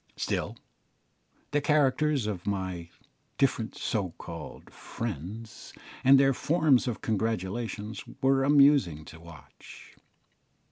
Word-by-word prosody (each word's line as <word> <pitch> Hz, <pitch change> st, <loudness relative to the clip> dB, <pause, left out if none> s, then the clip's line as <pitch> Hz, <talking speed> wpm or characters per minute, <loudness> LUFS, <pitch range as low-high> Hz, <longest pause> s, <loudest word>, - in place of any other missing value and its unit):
Still, -, -, -3 dB, 0.9 s
the 145 Hz, -, +1 dB
characters 145 Hz, -2 st, +2 dB
of 100 Hz, -4 st, -4 dB
my 95 Hz, -4 st, -3 dB, 0.5 s
different 120 Hz, -5 st, 0 dB
so 100 Hz, -6 st, -2 dB
called 85 Hz, -2 st, -9 dB
"friends," 110 Hz, +1 st, -7 dB, 0.3 s
and 135 Hz, +1 st, +7 dB
their 135 Hz, 0 st, +4 dB
forms 150 Hz, -3 st, +2 dB
of 120 Hz, -, -3 dB
congratulation, 110 Hz, 0 st, -2 dB, 0.3 s
were 135 Hz, 0 st, +3 dB
amusing 140 Hz, -, +4 dB
to 80 Hz, -, -12 dB
watch. 85 Hz, -3 st, -14 dB
115 Hz, 100 wpm, -28 LUFS, 95-135 Hz, 0.9 s, and